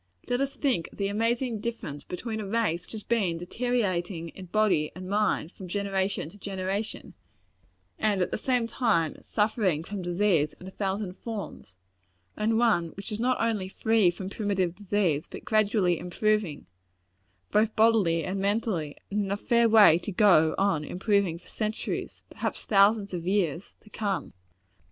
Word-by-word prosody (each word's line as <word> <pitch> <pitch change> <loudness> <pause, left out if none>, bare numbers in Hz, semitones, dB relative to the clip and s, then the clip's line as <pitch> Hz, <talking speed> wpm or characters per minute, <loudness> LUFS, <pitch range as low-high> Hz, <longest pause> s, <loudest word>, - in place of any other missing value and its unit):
Let 245 +2 0
us 275 0 -1
think 255 - 0
of - - -16
the 200 -1 0
amazing 230 +2 0
difference 205 -11 -5
between 220 +4 -5
a 205 - -5
race 195 -6 0
which - - -11
has 215 -2 -6
been 200 -8 0
deteriorating 180 -4 -1
in 185 +3 -10
body 190 -6 +2
and 185 0 -7
mind, 200 -4 0
from 190 - -10
generation 195 -2 -1
to 205 - -16
generation, 195 +2 -4 0.9
and 210 -3 +1
at 180 - 0
the - - -1
same 250 0 +1
time 220 - 0
suffering 210 -7 0
from 195 +2 -5
disease 175 -4 +1
in - - -11
a 190 - -8
thousand 195 -1 -3
forms, 210 - -7 0.6
and 220 +1 +1
one 225 -8 +3
which 200 +3 -7
is 210 - -3
not 250 +2 +1
only 220 -5 0
free 220 -1 +3
from 190 +2 -5
primitive 195 -5 0
disease, 190 -6 0
but - - -9
gradually 210 -5 +2
improving, 190 -2 -1 0.9
both 215 +1 +2
bodily 215 -7 +3
and 190 +5 -3
mentally, 195 -7 -1
and 205 0 0
in 195 - -4
a 200 - 0
fair 235 +2 +3
way 210 -7 +7
to 205 - -5
go 180 -6 +5
on 195 -6 +1
improving 190 0 0
for 175 - -19
centuries 215 0 -4
perhaps - - -4
thousands 200 0 +4
of 175 -1 -4
years 185 -3 0
to - - -25
come! 200 -3 -3
200 Hz, 165 wpm, -27 LUFS, 180-220 Hz, 0.9 s, way